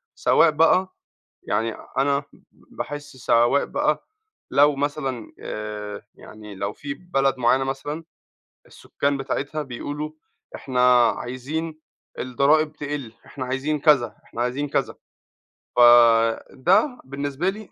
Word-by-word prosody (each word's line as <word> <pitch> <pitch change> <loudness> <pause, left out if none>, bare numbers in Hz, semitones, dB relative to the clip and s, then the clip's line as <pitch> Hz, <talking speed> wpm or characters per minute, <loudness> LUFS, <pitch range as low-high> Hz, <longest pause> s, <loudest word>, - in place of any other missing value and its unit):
سواء - - +4
بقى 180 +4 +3 0.5
يعني 110 +2 -1 0.2
أنا 140 +1 +2 0.3
باحس 145 -2 -8
سواء 120 +2 +3
بقى - - -1 0.4
لو 145 0 +5
مثلًا 135 -5 -3
آآ 105 -1 -6
يعني 105 -2 -12
لو 100 +2 -3
في 140 -1 -6
بلد 135 -7 0
معيّنة 130 +2 +3
مثلًا 145 +4 -4 0.6
السكان 140 0 -2
بتاعتها 140 +3 -3
بيقولوا 145 +4 -5 0.4
إحنا 125 -2 +4
عايزين 155 +6 -5 0.4
الضرائب 145 +5 +2
تقل، 145 -6 -5
إحنا 130 -2 -6
عايزين 140 +4 -1
كذا، 130 -8 +3
إحنا 120 - -5
عايزين 135 +4 -2
كذا. - - -1 0.8
فده 120 - +4
بالنسبة 140 +5 -3
لي 210 0 -5
135 Hz, 110 wpm, -23 LUFS, 120-150 Hz, 0.8 s, لو